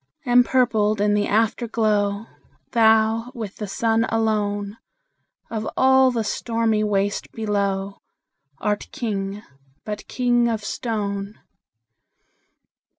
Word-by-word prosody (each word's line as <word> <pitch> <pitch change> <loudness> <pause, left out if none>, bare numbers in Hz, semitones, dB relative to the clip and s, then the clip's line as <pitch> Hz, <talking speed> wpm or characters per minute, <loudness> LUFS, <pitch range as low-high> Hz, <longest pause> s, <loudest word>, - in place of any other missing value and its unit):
Empurpled 240 -4 +3
in 205 0 +2
the 205 0 +1
Afterglow, 215 -2 +1 0.5
Thou, 225 +1 +3
with 215 -4 -6
the 210 - -5
Sun 225 +3 +1
alone, 210 -2 -1 0.7
Of 220 -1 -3
all 265 0 +5
the 235 -3 -1
stormy 225 0 0
waste 205 -1 -1
below, 200 -2 -2 0.6
Art 210 +4 -2
King, 205 -3 -4 0.4
but 210 0 -6
king 240 -1 +2
of 225 -2 -2
stone! 205 -3 -3
215 Hz, 95 wpm, -22 LUFS, 205-230 Hz, 0.7 s, all